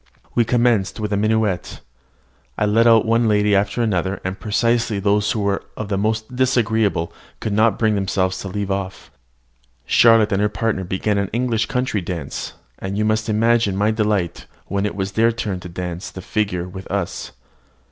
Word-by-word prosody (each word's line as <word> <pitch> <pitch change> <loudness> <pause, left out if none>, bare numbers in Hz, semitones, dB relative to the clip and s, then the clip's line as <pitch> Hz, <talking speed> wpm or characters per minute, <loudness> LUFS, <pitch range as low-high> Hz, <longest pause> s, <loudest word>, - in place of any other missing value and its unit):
We 120 - +3
commenced 120 -4 +1
with 105 -1 -2
a - - +3
minuet. 105 -2 0 0.8
I - - +1
led 115 +3 +4
out 115 -1 +6
one 115 +1 +2
lady 105 -1 +3
after 100 +4 +1
another, 95 -3 -1
and 95 +2 -4
precisely 115 0 +1
those 105 +1 +2
who 110 - -1
were 100 -1 0
the 105 -2 -2
most 110 +4 -1
disagreeable 115 -8 +1 0.3
could 110 - -3
not 110 +2 +3
bring 110 -2 +2
themselves 95 -2 0
to 100 - -5
leave 100 +1 -3
off. 95 -1 -4 0.7
Charlotte 115 -2 +5
and 100 0 +1
her 105 - +2
partner 105 -2 -1
began 100 +3 -1
an 100 -1 -1
English 115 -1 0
country 125 -5 -1
dance, 85 -5 -5 0.3
and 95 +1 -4
you 105 - +1
must 110 +1 0
imagine 115 -1 +2
my 105 +2 +2
delight 105 -5 -1 0.2
when 100 +1 -1
it - - -5
was 95 -1 -2
their 115 +3 +3
turn 105 -5 -3
to 90 - -9
dance 90 0 -5
the 95 - -9
figure 95 -5 -1
with 95 +1 -9
us. - - -3
105 Hz, 180 wpm, -20 LUFS, 95-110 Hz, 0.8 s, out